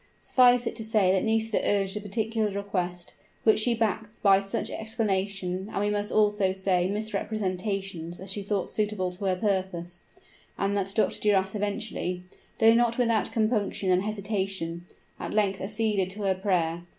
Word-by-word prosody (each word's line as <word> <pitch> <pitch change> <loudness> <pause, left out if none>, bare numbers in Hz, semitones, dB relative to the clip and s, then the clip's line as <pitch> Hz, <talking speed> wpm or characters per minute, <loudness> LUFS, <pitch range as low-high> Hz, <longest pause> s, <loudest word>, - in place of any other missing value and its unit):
Suffice 245 -1 +4
it - - -3
to 225 - -4
say 215 -4 +3
that 190 -1 +2
Nisida 225 0 +1
urged 195 -1 +1
a 210 - -3
particular 220 +1 -1
request, 185 -3 -3 0.3
which 220 -1 +5
she 235 +2 +2
backed 220 -1 -2
by 195 -2 +6
such 195 0 -3
explanation 200 -3 -2
and - - -2
we 205 +1 +1
must 205 0 -1
also 210 -2 +3
say 190 -2 +1
misrepresentations 195 -4 -3
as 190 +1 -4
she 205 - -2
thought 200 -1 -2
suitable 210 -4 -1
to 185 +3 -6
her 185 -1 +2
purpose; 185 -3 -2 0.6
and 200 +1 0
that 195 -1 -1
Dr. 220 - +1
Duras 195 -2 +2
eventually, 200 -3 -3 0.3
though 225 0 +6
not 235 0 +2
without 230 -3 +1
compunction 215 -4 0
and 180 0 +4
hesitation, 195 -5 -3 0.3
at - - -4
length 200 -2 +1
acceded 210 -2 0
to 205 +2 -6
her 195 -1 +3
prayer. 175 -3 0
200 Hz, 160 wpm, -27 LUFS, 190-215 Hz, 0.6 s, by